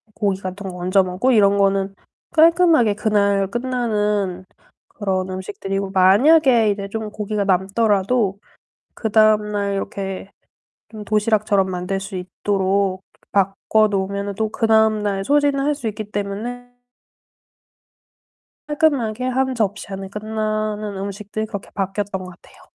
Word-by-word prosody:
고기 200 -3 0
같은 190 +1 -6
거 180 - -8
얹어 185 +2 +2
먹고 185 +8 0
이런 200 -3 +4
거는 195 0 +1 0.4
깔끔하게 325 - +5
그날 200 -2 +1
끝나는 210 -5 -1 0.4
그런 190 -3 -2
음식들이고 195 +1 -4
만약에 230 - +5
이제 200 -1 -4
좀 220 +1 -5
고기가 210 0 -3
남더라도 200 +2 +1 0.6
그 220 - -3
다음날 210 -2 +3
이렇게 195 0 -5 0.6
좀 215 -2 -9
도시락처럼 210 -2 +1
만들 180 +1 -3
수 195 0 -7
있도록 190 +1 -1 0.3
바꿔 200 +2 +2
놓으면은 200 0 -2
또 220 0 -1
그 225 - -1
다음날 215 -3 +2
소진을 285 +1 +2
할 295 0 +1
수 265 -6 -5
있기 210 0 -7
때문에 220 +5 -5 2.0
깔끔하게 270 -7 +1
1 260 +1 0
접시 215 -3 -2
안에 195 0 -6
끝나는 215 0 -3
음식들 200 +2 -5
그렇게 205 -3 -7
바뀌었던 195 -1 -3
거 180 - -9
같아요. 175 - -18
205 Hz, 280 characters per minute, -20 LUFS, 195-220 Hz, 2.0 s, 깔끔하게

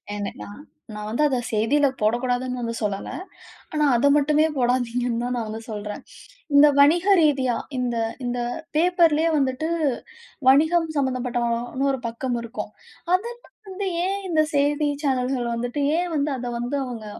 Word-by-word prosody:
என 205 -1 -4
நான் 205 +8 -10 0.3
நான் 210 0 -6
வந்து 235 +7 -1
அதை 260 -2 0
செய்தில 260 +7 +2
போடக்கூடாதுன்னு 245 +3 0
வந்து 230 -1 -3
சொல்லலை. 200 -1 -3 0.6
ஆனா, 300 -1 +2
அத 275 +5 +3
மட்டுமே 300 +2 +3
போடாதீங்கன்னு 245 -1 0
தான் 250 0 -2
நான் 225 - -3
வந்து 220 +1 -6
சொல்றேன். 210 -1 -5 0.5
இந்த 295 +1 +8
வணிக 330 +6 +5 0.2
ரீதியா 265 -5 +2 0.2
இந்த 245 -1 -1 0.3
இந்த 245 0 -2 0.4
பேப்பர்லயே 330 -2 +3
வந்துட்டு 270 +3 0 0.8
வணிகம் 320 +4 +4
சம்மந்தப்பட்ட 255 -3 -1 0.5
ஒரு 265 - -3
பக்கம் 240 +1 -3
இருக்கும். 215 -2 -6 0.4
அதெல்லாம் 475 +5 -3
வந்து 385 +1 -4 0.2
ஏன் 395 +1 -1
இந்த 310 -2 +3
செய்தி 290 +1 +2
சேனல்கள் 255 -2 0
வந்துட்டு, 245 +4 -2 0.2
ஏன் 355 -1 -2
வந்து 290 0 0
அதை 245 0 -4
வந்து 250 +4 -2
அவங்க 230 -4 -7
255 Hz, 145 wpm, -23 LUFS, 240-300 Hz, 0.8 s, இந்த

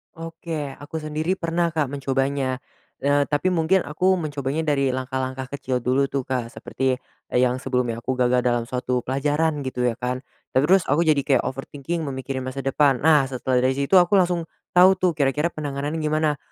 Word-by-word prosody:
Oke, 165 -2 -5
aku 155 +2 -6
sendiri 155 +3 -1
pernah, 170 -2 -1
Kak, 155 -5 0
mencobanya, 135 -1 -1 0.4
eee, 145 0 +3
tapi 145 +6 0
mungkin 180 +2 +2
aku 180 +6 +1
mencobanya 150 -4 -2
dari 140 -4 +1
langkah-langkah 130 0 -3
kecil 125 -2 -2
dulu 130 +3 +2
tuh, 135 0 -2
Kak, 125 -2 -3
seperti, 130 -1 -2 0.3
eee, 125 - +4
yang 125 0 +2
sebelumnya 125 -3 -1
aku 130 +2 -2
gagal 125 0 +2
dalam 120 -1 0
suatu 125 0 -1
pelajaran 145 +3 0
gitu 130 -1 -3
ya, 115 - -5
kan. 125 +1 -3 0.3
Eee, 130 - +4
terus 180 +5 +4
aku 145 +4 +2
jadi 155 -3 +3
kayak 135 -4 +3
overthinking 145 +5 -5
memikirkan 130 -1 -4
masa 130 +1 -4
depan, 135 -1 +2
nah 150 -3 +5
setelah 130 -1 -1
dari 130 +1 +2
situ 140 +7 +3
aku 180 +2 +4
langsung 175 -3 +3 0.2
tau 180 +2 +6
tuh, 180 -3 0
kira-kira 145 +3 +1
penanganan 145 0 -4
gimana, 155 -1 0
140 Hz, 180 wpm, -23 LUFS, 130-160 Hz, 0.4 s, tau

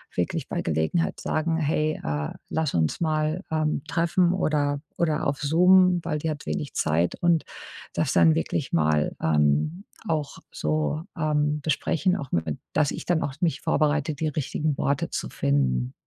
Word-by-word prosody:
wirklich - - -2
bei - - -2
Gelegenheit 80 - 0
sagen: 160 +1 0
„Hey, 155 0 0
äh, 75 0 -2 0.2
lass 160 -2 -1
uns 80 -2 +1
mal, 155 +2 0
ähm, 155 -3 0
treffen 170 +2 +2
oder 145 -5 0 0.2
oder 160 -3 +1
auf 140 0 -1
Zoom.“, 180 +4 +5
weil 160 -3 -1
die 155 +1 -2
hat 150 -1 -7
wenig 145 - -3
Zeit 80 +3 +1
und 170 -2 +3 0.5
das - - 0
dann 80 -2 +6
wirklich 80 - -2
mal, 75 -2 +2
ähm, 75 - +1 0.2
auch 155 -5 -2
so, 75 - -1
ähm, 150 -1 0
besprechen, 165 +4 +1
auch 140 -7 -7
mit 80 -3 -1 0.2
dass 150 -2 +2
ich - - -6
dann 175 -2 +1
auch 135 -1 -3
mich 165 -5 0
vorbereite, 150 0 +1
die 155 +2 -2
richtigen 150 0 -2
Worte 145 +4 0
zu - - -3
finden. 65 -3 0
150 Hz, 160 wpm, -25 LUFS, -, 0.5 s, dann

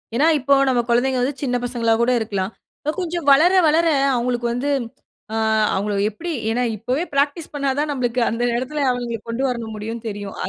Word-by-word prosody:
ஏனா 300 +6 +4
இப்போ 280 +2 +2 0.2
நம் 240 -2 +1
குழந்தைகள் 250 +2 +2
வந்து 275 - 0
சின்ன 250 -2 0
பசங்களா 235 -2 +1
கூட 245 +2 +3
இருக்கலாம். 200 -2 -2 0.5
கொஞ்சம் 345 -4 -3
வளர 320 +7 +6 0.2
வளர 320 +2 +3 0.3
அவங்களுக்கு 240 0 -1
வந்து, 260 +4 -2 0.6
ஆ - - -2 0.4
அவங்கள 205 +1 -1 0.2
எப்படி 335 +12 -6 0.2
ஏனா 245 +2 0
இப்போவே 250 - -1
பிராக்டிஸ் 285 +3 0
பண்னா 280 -1 0
தான் 300 0 0
நம்மளுக்கு 250 -2 -1
அந்த 230 +1 -3 0.2
இடத்தில 280 +3 -2
அவங்களை 240 -2 -3
கொண்டு 230 +3 -2
வர 250 - -2 0.2
முடியுனு 225 +2 -6
தெரியும். 205 -1 -7
250 Hz, 170 wpm, -21 LUFS, 230-280 Hz, 0.6 s, வளர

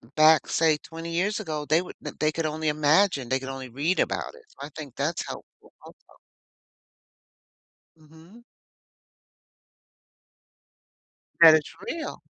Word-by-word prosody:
back, 155 0 +5
say, 160 -2 +2
20 165 +2 -9
years 195 +6 0
ago, 155 -7 -4
they 155 +3 +2
would 180 - -10 0.2
they 155 0 +2
could 160 +1 -3
only 155 +1 -3
imagine, 150 -2 +2
they 130 +1 +1
could 135 0 -7
only 135 -1 -7
read 150 +9 -1
about - - -2
it. 475 - -17
So - - -26
I - - -14
think 145 -5 -9
that's 155 +4 -2
helpful - - -12
also. - - -18 1.8
Mhm. 160 +9 -18 3.0
That 165 -2 +10
it's 155 -2 -2
real. 330 - -5
155 Hz, 130 wpm, -25 LUFS, 150-170 Hz, 3.0 s, That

